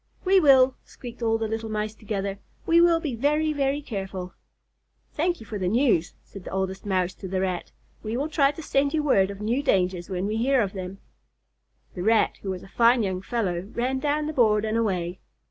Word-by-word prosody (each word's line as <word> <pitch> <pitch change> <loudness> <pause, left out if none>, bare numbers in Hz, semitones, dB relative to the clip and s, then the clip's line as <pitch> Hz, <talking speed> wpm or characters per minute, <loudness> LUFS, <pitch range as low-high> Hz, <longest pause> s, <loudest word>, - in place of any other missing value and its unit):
"We 380 +1 +5
will," 265 -5 +5
squeaked 240 -1 -11
all 225 -1 +2
the 225 0 -2
little 225 0 -4
Mice 215 0 -2
together. 200 -2 -4 0.3
"We 335 +1 +5
will 340 -1 +5
be 300 -5 -3
very, 300 +6 +1
very 280 0 0
careful." 190 -6 -5 0.8
"Thank 345 +3 0
you 225 - -11
for 210 -1 -5
the 185 - -1
news," 220 - +2
said 195 - -12
the - - -7
Oldest 190 +1 -3
Mouse 185 -2 0
to 190 - -9
the 185 0 -2
Rat. 185 -2 -3 0.3
"We 220 +2 -3
will 285 +3 -1
try 300 -3 +3
to 295 +3 -7
send 280 +1 +1
you 305 - +1
word 195 -10 +3
of 200 0 -8
new 235 +6 0
dangers 185 -9 0
when 185 0 -2
we 215 +2 -1
hear 260 +3 +2
of 195 - -4
them." 190 0 -6 1.0
The 180 - -6
Rat, 220 +3 +2
who 195 - -5
was 185 -1 -4
a - - -12
fine 235 +3 +3
young 185 -2 -2
fellow, 195 -4 -2
ran 260 +2 -1
down 295 +2 0
the 310 - -3
board 215 -5 +3
and 220 0 -1
away. 185 -5 -1
220 Hz, 215 wpm, -25 LUFS, 190-275 Hz, 1.0 s, We